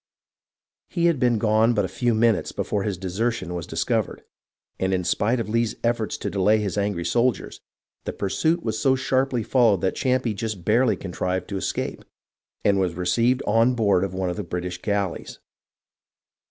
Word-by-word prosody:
He 170 Hz, -2 st, 0 dB
had 170 Hz, -5 st, +3 dB
been 120 Hz, -2 st, +3 dB
gone 110 Hz, +2 st, +3 dB
but 105 Hz, -3 st, +2 dB
a -, -, -2 dB
few 115 Hz, +5 st, 0 dB
minutes 115 Hz, -1 st, +2 dB
before 105 Hz, -, -2 dB
his 100 Hz, -2 st, -2 dB
desertion 95 Hz, +1 st, -2 dB
was 85 Hz, -2 st, -5 dB
dis 80 Hz, 0 st, -1 dB
covered, 110 Hz, +2 st, -1 dB, 0.6 s
and 95 Hz, 0 st, +1 dB
in 90 Hz, -, -1 dB
spite 115 Hz, +7 st, +1 dB
of 115 Hz, -, -3 dB
Lee's 115 Hz, +1 st, 0 dB
efforts 115 Hz, -4 st, 0 dB
to -, -, -3 dB
delay 100 Hz, +2 st, +3 dB
his 100 Hz, -4 st, -2 dB
angry 100 Hz, -4 st, -1 dB
soldiers, 120 Hz, -2 st, 0 dB, 0.4 s
the -, -, -2 dB
pursuit 160 Hz, -, 0 dB
was 110 Hz, -1 st, -2 dB
so 135 Hz, -2 st, +3 dB
sharply 130 Hz, -2 st, 0 dB
followed 115 Hz, -6 st, +3 dB
that 95 Hz, -, +1 dB
Champe 130 Hz, -3 st, 0 dB
just 100 Hz, -4 st, -4 dB
barely 120 Hz, +4 st, +3 dB
contrived 90 Hz, 0 st, -3 dB
to 100 Hz, -, -3 dB
escape -, -, -3 dB, 0.6 s
and 100 Hz, -1 st, +4 dB
was 90 Hz, -3 st, 0 dB
received 115 Hz, +9 st, +1 dB
on 115 Hz, +4 st, +3 dB
board 100 Hz, -5 st, +2 dB
of 95 Hz, -1 st, -3 dB
one 95 Hz, -1 st, -1 dB
of 90 Hz, -, -6 dB
the 105 Hz, -, -3 dB
British 90 Hz, 0 st, -5 dB
galleys. 100 Hz, -4 st, -2 dB
105 Hz, 180 wpm, -24 LUFS, 95-120 Hz, 0.6 s, and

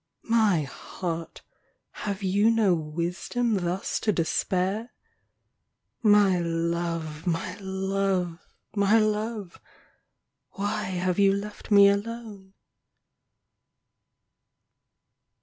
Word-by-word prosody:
My 215 Hz, -8 st, +3 dB
heart, 165 Hz, +4 st, -6 dB, 0.5 s
have 200 Hz, -1 st, -5 dB
you 200 Hz, +4 st, +3 dB
no 220 Hz, -5 st, +3 dB
wisdom 175 Hz, +9 st, -2 dB
thus 185 Hz, 0 st, -1 dB
to 215 Hz, -, +1 dB
despair? 190 Hz, +5 st, -1 dB, 1.1 s
My 205 Hz, -4 st, +5 dB
love, 165 Hz, -1 st, -2 dB
my 175 Hz, +2 st, -1 dB
love, 190 Hz, -2 st, -1 dB, 0.4 s
my 200 Hz, +2 st, +4 dB
love, 215 Hz, -3 st, -1 dB, 0.9 s
why 205 Hz, +1 st, -2 dB
have 185 Hz, 0 st, -1 dB
you 200 Hz, -1 st, +6 dB
left 205 Hz, +1 st, -6 dB
me 200 Hz, -1 st, +8 dB
alone 200 Hz, -1 st, -3 dB
195 Hz, 80 wpm, -26 LUFS, 175-210 Hz, 1.1 s, me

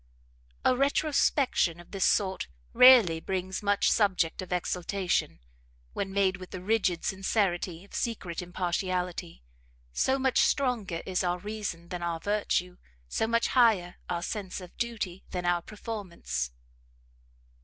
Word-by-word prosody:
A 255 Hz, -, +5 dB
retrospection 275 Hz, -, +2 dB
of 175 Hz, -, -14 dB
this 195 Hz, -3 st, 0 dB
sort 190 Hz, -2 st, +1 dB, 0.3 s
rarely 240 Hz, -11 st, +8 dB
brings 185 Hz, +1 st, -3 dB
much 205 Hz, -1 st, +2 dB
subject 185 Hz, -6 st, +2 dB
of 185 Hz, -, -9 dB
exultation, 180 Hz, -, -1 dB, 0.5 s
when 195 Hz, -1 st, -3 dB
made 190 Hz, -1 st, +2 dB
with 185 Hz, -1 st, -10 dB
the 185 Hz, -, -6 dB
rigid 185 Hz, -3 st, 0 dB
sincerity 190 Hz, -3 st, -1 dB
of -, -, -21 dB
secret 185 Hz, -8 st, -3 dB
impartiality: 180 Hz, -, -3 dB, 0.5 s
so 265 Hz, -, +2 dB
much 265 Hz, -1 st, +2 dB
stronger 230 Hz, -11 st, +1 dB
is 185 Hz, 0 st, -1 dB
our 175 Hz, 0 st, 0 dB
reason 190 Hz, -4 st, -5 dB
than 180 Hz, -1 st, -5 dB
our 170 Hz, -1 st, -2 dB
virtue, 190 Hz, -2 st, -1 dB, 0.3 s
so 220 Hz, -, 0 dB
much 230 Hz, 0 st, +1 dB
higher 220 Hz, -8 st, +3 dB
our 170 Hz, -1 st, -2 dB
sense 195 Hz, -1 st, -4 dB
of 180 Hz, -2 st, -12 dB
duty 210 Hz, -6 st, -3 dB
than 180 Hz, -1 st, -4 dB
our 175 Hz, 0 st, +2 dB
performance! 205 Hz, -, -5 dB
185 Hz, 135 wpm, -29 LUFS, 175-215 Hz, 0.5 s, rarely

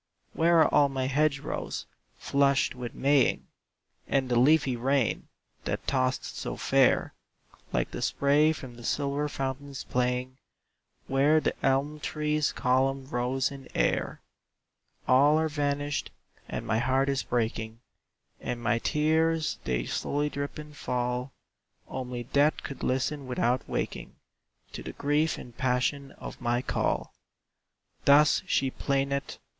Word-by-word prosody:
"Where 165 Hz, 0 st, +4 dB
are -, -, +3 dB
all 145 Hz, -1 st, +5 dB
my 135 Hz, -1 st, -2 dB
hedge 140 Hz, +1 st, +1 dB
rows, -, -, -4 dB, 0.3 s
flushed 140 Hz, -2 st, +2 dB
with 125 Hz, -2 st, -7 dB
Maying? 140 Hz, -1 st, +2 dB, 0.6 s
And 135 Hz, -2 st, +1 dB
the 120 Hz, -1 st, +3 dB
leafy 140 Hz, 0 st, +4 dB
rain, 130 Hz, 0 st, 0 dB, 0.4 s
that -, -, -3 dB
tossed 130 Hz, -1 st, 0 dB
so -, -, -4 dB
fair, -, -, +3 dB, 0.6 s
Like -, -, -1 dB
the -, -, -5 dB
spray 145 Hz, +3 st, +3 dB
from 125 Hz, -6 st, -8 dB
silver 145 Hz, +3 st, -1 dB
fountains 135 Hz, 0 st, -4 dB
playing, 125 Hz, +1 st, -1 dB, 0.7 s
Where 140 Hz, +4 st, +3 dB
the -, -, 0 dB
elm 140 Hz, +3 st, +1 dB
tree's 150 Hz, 0 st, 0 dB
column 135 Hz, +1 st, +1 dB
rose 130 Hz, +2 st, 0 dB
in 135 Hz, -1 st, -10 dB
air? -, -, 0 dB, 0.9 s
"All 145 Hz, +4 st, +5 dB
are 160 Hz, 0 st, +2 dB
vanished, 145 Hz, -1 st, -1 dB, 0.4 s
and -, -, -4 dB
my 110 Hz, -1 st, +1 dB
heart 130 Hz, +3 st, +2 dB
is 135 Hz, -1 st, +1 dB
breaking; 115 Hz, -1 st, -2 dB, 0.6 s
And 125 Hz, -1 st, -4 dB
my 120 Hz, 0 st, +1 dB
tears 160 Hz, +3 st, +1 dB
they -, -, -1 dB
slowly 145 Hz, -, -1 dB
drip 140 Hz, +2 st, -4 dB
and 150 Hz, -1 st, -9 dB
fall; 125 Hz, 0 st, -2 dB, 0.6 s
Only 125 Hz, -2 st, -5 dB
death 145 Hz, +5 st, +2 dB
could 140 Hz, -, -7 dB
listen 135 Hz, +2 st, -1 dB
without 125 Hz, 0 st, 0 dB
waking -, -, -4 dB, 0.6 s
To -, -, -7 dB
the -, -, -7 dB
grief 150 Hz, +3 st, +1 dB
and 120 Hz, -2 st, -11 dB
passion 130 Hz, +2 st, 0 dB
of -, -, -9 dB
my 120 Hz, 0 st, 0 dB
call!" -, -, -1 dB, 0.9 s
Thus 145 Hz, +2 st, +6 dB
she 135 Hz, -1 st, +1 dB
plaineth. 140 Hz, 0 st, -1 dB
135 Hz, 130 wpm, -28 LUFS, 125-145 Hz, 0.9 s, Thus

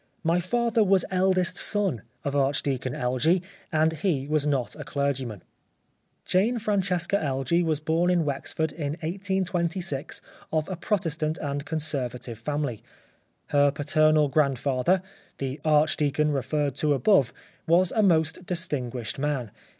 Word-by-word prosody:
My 165 Hz, +1 st, +2 dB
father 230 Hz, +4 st, +1 dB
was 195 Hz, -2 st, +3 dB
eldest 185 Hz, -1 st, +2 dB
son 195 Hz, -, +1 dB, 0.2 s
of 140 Hz, 0 st, -2 dB
Archdeacon 135 Hz, -2 st, 0 dB
Elgee, 130 Hz, +9 st, +1 dB, 0.3 s
and 160 Hz, 0 st, +2 dB
he 155 Hz, -4 st, -1 dB
was 150 Hz, -1 st, +1 dB
not 130 Hz, -7 st, -1 dB
a 150 Hz, -, -7 dB
clergy 140 Hz, -2 st, -1 dB
man." 105 Hz, -6 st, -8 dB, 0.8 s
Jane 215 Hz, +7 st, +2 dB
Francesca 195 Hz, -4 st, 0 dB
Elgee 140 Hz, +4 st, +1 dB
was 160 Hz, -3 st, 0 dB
born 160 Hz, +3 st, +1 dB
in 175 Hz, -3 st, +2 dB
Wexford 150 Hz, +2 st, -1 dB
in 145 Hz, -2 st, -3 dB
1826 180 Hz, -4 st, -2 dB, 0.3 s
of 155 Hz, -1 st, 0 dB
a 185 Hz, -, -2 dB
Protestant 165 Hz, -4 st, -1 dB
and 145 Hz, 0 st, -4 dB
Conservative 125 Hz, -6 st, -3 dB
family. 145 Hz, -3 st, -2 dB, 0.7 s
Her 145 Hz, 0 st, +4 dB
paternal 155 Hz, +1 st, +3 dB
grandfather, 140 Hz, +4 st, +1 dB, 0.3 s
the 135 Hz, +1 st, -4 dB
Archdeacon 150 Hz, -1 st, +2 dB
re 140 Hz, -2 st, 0 dB
ferred 145 Hz, +2 st, -1 dB
to 150 Hz, -1 st, +2 dB
above, 140 Hz, -, +3 dB, 0.4 s
was 170 Hz, +2 st, +4 dB
a 220 Hz, -, +2 dB
most 160 Hz, -3 st, +2 dB
distinguished 130 Hz, -, -3 dB
man. 135 Hz, -6 st, -1 dB
155 Hz, 135 wpm, -26 LUFS, 140-175 Hz, 0.8 s, Her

